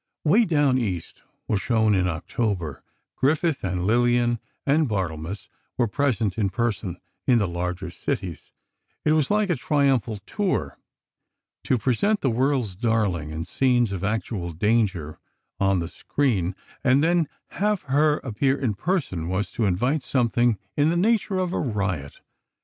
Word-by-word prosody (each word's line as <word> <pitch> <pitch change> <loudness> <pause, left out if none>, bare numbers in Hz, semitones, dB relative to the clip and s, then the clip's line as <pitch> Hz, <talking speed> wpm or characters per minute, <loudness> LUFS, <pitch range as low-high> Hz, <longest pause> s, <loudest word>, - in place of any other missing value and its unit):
"Way 205 +10 +5
Down 145 -6 +3
East" 95 -8 -4 0.3
was 100 -3 0
shown 110 -3 +2
in 90 -2 +2
October. 90 - -2 0.3
Griffith, 155 +2 +1
with 95 -1 -2
Lillian 120 +5 +2 0.3
and 145 0 +3
Barthelmess, 90 -2 -3 0.3
were 120 - +2
present 115 -6 0
in 100 -3 +2
person, 105 -5 -2 0.3
in 125 -3 +5
the 105 -4 +2
larger 90 +1 -3
cities. 85 -1 -4 0.5
It 155 - +4
was 155 -3 +2
like 210 -2 +2
a - - +2
triumphal 135 -5 +1
tour. 205 -3 -2 0.9
To 130 - +2
present 135 - +1
the 135 - +2
"world's 125 -3 +1
darling" 100 -8 0
in 80 +1 -4
scenes 125 -5 +2
of 95 -1 -4
actual 100 -4 -2
danger, 95 -5 0 0.4
on 95 -1 +3
the 85 - -3
screen, 95 - -1 0.3
and 135 +1 +4
then 170 -1 +3 0.2
have 210 -2 0
her 150 +2 +3
appear 130 +3 +1
in 120 -6 0
person, 100 - -2
was 95 +3 -1
to 115 - -1
invite 125 - +1
something 120 -3 +2 0.2
in 145 +1 +3
the 170 - +1
nature 210 0 +2
of 185 -1 -1
a - - 0
riot. 95 - -2
115 Hz, 150 wpm, -24 LUFS, 95-145 Hz, 0.9 s, Way